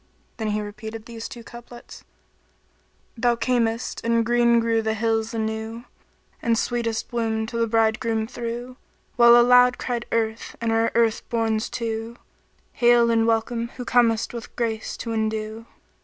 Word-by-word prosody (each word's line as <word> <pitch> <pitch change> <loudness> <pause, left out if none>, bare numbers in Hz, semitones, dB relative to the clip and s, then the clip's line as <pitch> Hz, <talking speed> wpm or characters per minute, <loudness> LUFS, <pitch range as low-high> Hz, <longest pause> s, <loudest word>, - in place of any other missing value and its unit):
And 215 -1 -1
he 210 - -1
repeated 220 +2 -8
these 230 -1 -7
two 240 -4 -10
couplets, 240 0 -12 1.1
"Thou 240 0 +2
camest 235 -1 -1
and 230 0 +2
green 235 0 +4
grew 230 -1 +1
the 220 0 -1
hills 225 0 0
anew; 220 0 -4 0.3
* - - -38
And 230 -1 +1
sweetest 230 -1 -2
bloom 225 -2 -1
to 230 +1 -5
the 230 0 +1
bridegroom 225 0 +1
threw, 240 +1 -6 0.4
While 235 0 +7
aloud 250 +1 +6
cried 240 -2 -3
Earth 225 0 -2
and 230 -1 -1
her 225 0 +2
earth 230 -2 +2
borns 225 -1 0
too 225 0 -4 0.3
* - - -40
'Hail 240 -1 +4
and 225 0 +2
welcome 230 +1 0
who 250 - -5
comest 230 -2 +2
with 235 -1 -8
grace 225 -2 -3
to 230 - -4
endue.'" 220 0 -3
230 Hz, 155 wpm, -23 LUFS, 225-235 Hz, 1.1 s, While